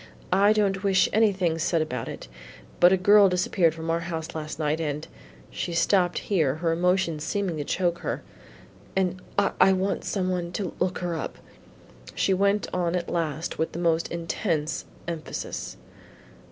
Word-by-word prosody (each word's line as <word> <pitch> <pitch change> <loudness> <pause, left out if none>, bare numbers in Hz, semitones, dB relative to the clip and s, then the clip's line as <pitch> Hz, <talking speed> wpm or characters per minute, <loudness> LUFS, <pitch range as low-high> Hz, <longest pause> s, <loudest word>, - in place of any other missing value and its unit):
"I 200 +2 +5
don't 200 -2 +1
wish 195 -1 +4
anything 190 -7 +2
said 165 +1 +1
about 125 -7 -3
it, - - -7 0.5
but 175 +1 +7
a 190 - +4
girl 200 +2 +6
disappeared 180 -2 +2
from 165 0 -3
our 165 - +1
house 165 -1 -5
last 155 -1 -5
night, 155 +1 0
and" 150 -1 -3 0.4
she 175 - -4
stopped 180 +1 +2
here, 155 -9 +1
her 165 +1 0
emotion 180 -1 +1
seeming 180 +1 -2
to 150 - -2
choke 175 +2 0
her - - -3 0.7
"and 185 -1 0 0.2
I 195 -1 +4
want 190 +1 -1
some 185 -2 -1
one 175 -1 -3
to 190 -5 -3
look 185 - 0
her 175 - -1
up," 160 - -5 0.8
she 195 - +2
went 200 +2 +2
on 175 -1 0
at 175 -1 -2
last 165 -1 -2
with 160 - -1
the - - -5
most 165 -1 +1
intense 165 -2 -2 0.2
emphasis. 165 -2 -5
175 Hz, 165 wpm, -26 LUFS, 160-190 Hz, 0.8 s, but